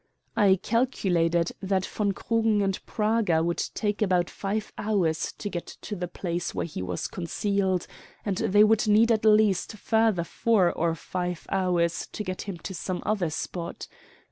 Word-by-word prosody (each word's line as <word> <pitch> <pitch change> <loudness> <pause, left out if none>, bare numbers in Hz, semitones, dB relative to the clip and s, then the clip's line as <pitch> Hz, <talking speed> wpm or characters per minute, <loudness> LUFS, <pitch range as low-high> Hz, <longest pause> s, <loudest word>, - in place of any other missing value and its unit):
I 195 -2 +5
calculated 175 -7 +1
that 190 -1 0
von 205 -2 -1
Krugen 220 0 +1
and 195 -1 -1
Praga 210 -7 +1
would 170 0 0
take 210 -1 -1
about 180 -4 +2
five 205 +2 -3
hours 185 -7 0
to - - -6
get 175 -4 -4 0.2
to 210 - -4
the 180 -2 -3
place 175 0 -4
where - - -1
he 155 - -6
was 155 - -3
concealed, 190 +1 -1 0.4
and 200 -3 -1
they 205 +2 +4
would 215 +1 +3
need 220 +3 +5
at 220 -1 +1
least 210 -2 +4
further 220 -3 +2
four 195 0 +2
or 165 0 0
five 180 +1 -4
hours 175 -3 +1
to 210 - -3
get 185 -2 -4
him 195 -3 -5
to 190 - -7
some 185 0 -4
other 200 -6 0
spot. 170 +2 -5
190 Hz, 165 wpm, -27 LUFS, 175-210 Hz, 0.4 s, I